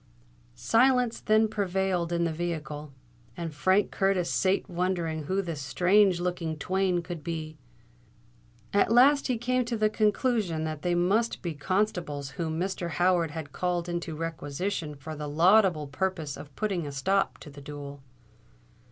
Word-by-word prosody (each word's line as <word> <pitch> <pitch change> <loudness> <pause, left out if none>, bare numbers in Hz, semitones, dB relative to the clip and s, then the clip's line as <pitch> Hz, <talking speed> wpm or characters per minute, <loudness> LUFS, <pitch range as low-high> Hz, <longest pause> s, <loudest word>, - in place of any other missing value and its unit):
Silence 240 - +3
then 215 +1 +3
prevailed 190 -4 -1
in 170 0 +1
the 165 - 0
vehicle; 155 -3 -4 0.5
and 165 -2 -4
Frank 185 +7 +2
Curtis 195 -3 +1
sate 190 +1 +1
wondering 170 -4 -2
who 190 +5 0
the 170 -3 -4
strange 180 +7 +3
looking 175 -3 -2
twain 185 +1 0
could 170 -3 -7
be. 155 -2 -5 1.1
At 200 +1 +3
last 275 +5 +5
he 250 -3 0
came 250 +2 +1
to 235 -1 -2
the 215 0 +2
conclusion 215 -6 +1
that 155 -1 -4
they 175 -1 0
must 200 +7 +1
be 170 -2 -2
constables 155 -4 -1
whom 160 -1 -3
Mr. 180 -1 -2
Howard 175 +1 +2
had 155 -1 -7
called 175 -1 -1
into 170 -2 -3
requisition 165 +1 -3
for 155 +3 -8
the 150 0 -5
laudable 175 0 +4
purpose 160 0 -3
of 145 -3 -11
putting 190 -7 -1
a - - -5
stop 190 +9 0
to 150 - -12
the 140 0 -11
duel. 145 -1 -8
175 Hz, 150 wpm, -28 LUFS, 155-195 Hz, 1.1 s, last